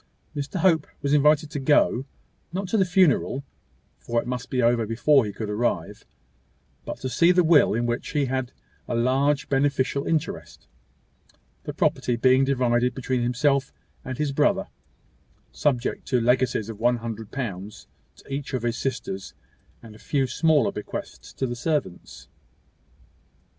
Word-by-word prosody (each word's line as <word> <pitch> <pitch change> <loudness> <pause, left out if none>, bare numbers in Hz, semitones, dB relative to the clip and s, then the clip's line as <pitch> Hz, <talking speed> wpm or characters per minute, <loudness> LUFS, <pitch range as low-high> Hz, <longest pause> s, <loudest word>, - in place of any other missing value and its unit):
Mr 145 +2 -5
Hope 165 -5 +3 0.2
was 140 0 +1
invited 150 +1 +3
to 145 - -3
go 135 -2 +3 0.5
not 190 +2 -3
to - - 0
the 195 -3 +4
funeral, 175 -7 +2 0.6
for 120 0 -1
it - - -5
must 125 +1 -4
be 130 - -1
over 120 -2 +2
before 125 +4 +3
he 105 - -4
could 110 +2 -5
arrive, 105 +4 -2 0.8
but - - -5
to 130 - -2
see 170 +8 +4
the 180 0 +4
will, 160 -9 +5
in 120 +1 0
which 120 +1 -2
he 145 -2 0
had 130 -1 -2 0.4
a - - -2
large 135 +4 +1
beneficial 140 0 0
interest, 160 -3 -3 1.0
the - - -4
property 120 - +1
being 130 +3 +4
divided 125 -2 +1
between 130 -1 -1
himself 135 +3 +1 0.3
and 130 -1 -5
his 150 -2 -1
brother, 135 - +1 0.8
subject 130 -4 -1
to 125 - +2
legacies 125 -2 +1
of 110 -2 -8
one 120 +1 +2
hundred 115 -2 -6
pounds 105 -5 -6 0.3
to - - -19
each 140 -1 -4
of 125 - -3
his 120 0 -1
sisters, 115 -8 -4 0.5
and 110 -2 -12
a 105 - -15
few 135 +1 0
smaller 155 +3 +2
bequests 65 -11 -7
to 135 - -3
the 120 -1 -3
servants. 120 - -3
130 Hz, 155 wpm, -25 LUFS, 120-145 Hz, 1.0 s, will